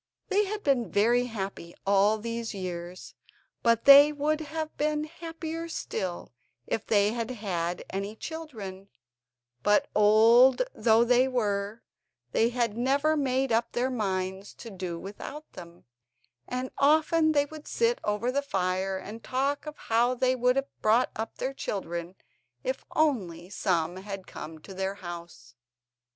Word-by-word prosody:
They 410 +1 +3
had 420 +2 -4
been 265 -5 +1
very 240 +4 +3
happy 195 -6 -6
all 200 +2 +4
these 230 0 -4
years, 180 -1 -6 0.5
but 230 -1 +2
they 280 +1 +10
would 300 +1 0
have 315 0 -5
been 300 0 0
happier 330 0 -6
still 180 - -4 0.3
if 220 - -3
they 205 -1 +3
had 230 0 -3
had 180 -7 -3
any 200 +2 -4
children; 220 -12 -7 0.7
but 205 0 +2
old 230 - +6
though 225 0 +4
they 250 +2 +4
were 210 -3 -1 0.5
they 225 - +3
had 235 -3 -1
never 280 +6 +2
made 265 -2 0
up 230 +1 +1
their 250 +2 0
minds 190 -3 -3
to 230 - -10
do 185 -3 -5
without 210 - -9
them, 170 -1 -12 0.6
and 255 +1 -3
often 315 +2 +4
they 285 -1 +3
would 305 +1 -11
sit 470 +1 +1
over 210 +4 0
the 280 +2 +1
fire 190 -6 -1
and 215 +4 -9
talk 275 +3 -1
of 300 - -7
how 240 +2 +1
they 255 +1 +2
would 250 0 +2
have 275 0 -4
brought 225 +4 +3
up 220 +1 -4
their 265 +1 -2
children 175 -7 -4 0.5
if - - -3
only 190 - 0
some 175 -3 0
had 195 -1 -7
come 160 +1 -8
to 195 - -10
their 190 +1 -2
house. 175 -3 -9
230 Hz, 145 wpm, -28 LUFS, 195-280 Hz, 0.7 s, they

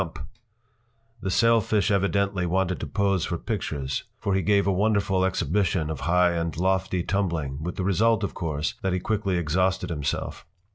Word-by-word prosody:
” 115 -1 -37
The 95 - -2
sailfish 110 -1 +3
evidently 100 -1 +1
wanted 95 0 0
to - - -4
pose 100 -3 +1
for 85 - -2
pictures, 75 - -3
for 100 - -1
he 95 - +2
gave 100 +3 +3
a 100 - +2
wonderful 100 -1 +1
exhibition 90 -2 0
of 80 - -5
high 90 0 +4
and 85 -1 -2
lofty 95 0 0
tumbling, 85 -9 -1
with 90 +2 -4
the 95 - -2
result, 110 +4 +2
of 100 - -2
course, 75 -3 -2
that 95 -1 0
he 90 - 0
quickly 100 -2 -1
exhausted 90 +3 0
himself. 75 -4 -3
95 Hz, 170 wpm, -25 LUFS, 85-100 Hz, -, high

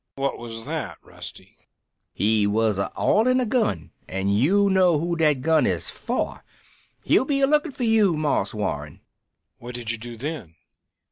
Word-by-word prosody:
"What 135 0 -2
was 115 -1 -7
that, - - -4
Rusty?" - - -11 0.6
"He 105 0 +2
was 105 -1 +1
a 100 - -2
oilin' 255 +4 +3
a 255 - +1
gun 215 - 0 0.2
an' 95 +1 -2
you 165 - +3
know 185 -4 +4
who 170 +3 -1
dat 150 -5 +2
gun 160 +2 +3
is - - -2
for. - - -3 0.6
He'll - - +4
be 275 0 0
a - - +6
lookin' 300 +2 +2
for 255 - -5
you, 215 -7 +3
Marse 145 -10 0
Warren." 75 -8 -4 0.6
"What 120 +1 -8
did 120 -2 -3
you 115 - -3
do 120 +1 -8
then? 120 - -6
140 Hz, 165 wpm, -24 LUFS, -, 0.6 s, a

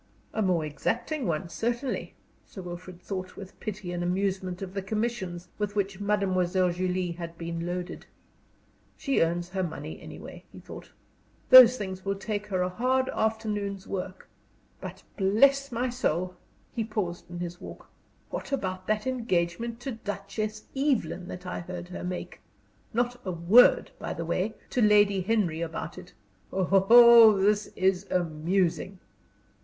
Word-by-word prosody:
A 220 - -1
more 180 -5 +1
exacting 240 - -2
one, 170 +2 -1
certainly. 240 +8 -3 0.3
Sir 190 - -10
Wilfrid 175 0 -8
thought 185 0 -6
with 190 -1 -11
pity 210 -4 -5
and 175 0 -3
amusement 185 0 -1
of 190 -1 -7
the 195 - -2
commissions 190 -4 -3
with 205 0 -2
which 200 -1 -1
Mademoiselle 185 -3 +1
Julie 180 0 -1
had 170 0 -7
been 170 0 -4
loaded. 180 0 -5 0.9
"She 275 -2 +1
earns 170 +1 0
her 190 0 -2
money, 120 - -5
any - - -9
way," - - -11
he - - -11
thought. - - -11 0.6
"Those 255 -1 +10
things 190 -3 -5
will 195 +1 -1
take 205 +1 -4
her 185 -3 0
a - - 0
hard 260 +7 +1
afternoon's 210 -3 -2
work. 185 0 -5 0.5
But, - - -8
bless 275 +8 +4
my 245 +2 -1
soul!" 180 - -1 0.4
he 230 - -1
paused 205 -7 -4
in 175 - -7
his 175 0 -6
walk - - -10 0.4
"what - - -5
about 185 -8 -3
that 215 0 0
engagement 230 -2 -1
to 270 - -4
Duchess 215 0 -5
Evelyn 245 - 0
that 180 -1 -8
I 180 - -4
heard 175 0 -7
her 180 - -6
make? 180 0 -5 0.5
Not 245 +1 -1
a 185 - -3
word, 180 +8 +5
by - - -4
the 170 - -4
way, 185 +6 -1 0.2
to 250 - +1
Lady 205 -2 +5
Henry 185 -5 0
about 165 +1 -5
it! 180 -1 -14 0.4
Oh, 220 +4 +7
this 210 +2 +2
is 190 +1 +1
amusing!" 175 +3 0
190 Hz, 150 wpm, -28 LUFS, 180-220 Hz, 0.9 s, Those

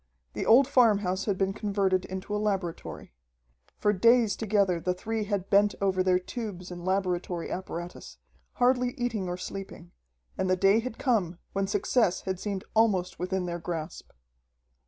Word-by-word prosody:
The - - -3
old 250 +4 +7
farmhouse 205 -8 +3
had 200 -3 0
been 195 0 0
converted 195 -3 0
into 190 +2 -5
a 210 - -1
laboratory. 190 - -3 0.6
For 210 - +2
days 230 0 +4
together 200 -5 +1
the 180 +2 -1
three 220 +3 -3
had 200 -2 -3
bent 205 +1 +4
over 190 -2 +1
their 185 -1 +3
tubes 185 -2 -6
and 175 -1 -7
laboratory 180 -2 -1
apparatus, 175 -1 -6 0.4
hardly 250 0 +2
eating 225 -7 -2
or 175 - -3
sleeping. 185 -2 -8 0.5
And 190 - 0
the 185 - +4
day 195 +3 +4
had 235 0 -5
come 200 -10 0 0.2
when 195 0 0
success 200 -1 +1
had 190 -2 -3
seemed 200 -2 -3
almost 195 -5 +2
within 185 +1 -1
their 175 0 -4
grasp. 165 -1 -6
195 Hz, 155 wpm, -28 LUFS, 180-215 Hz, 0.6 s, old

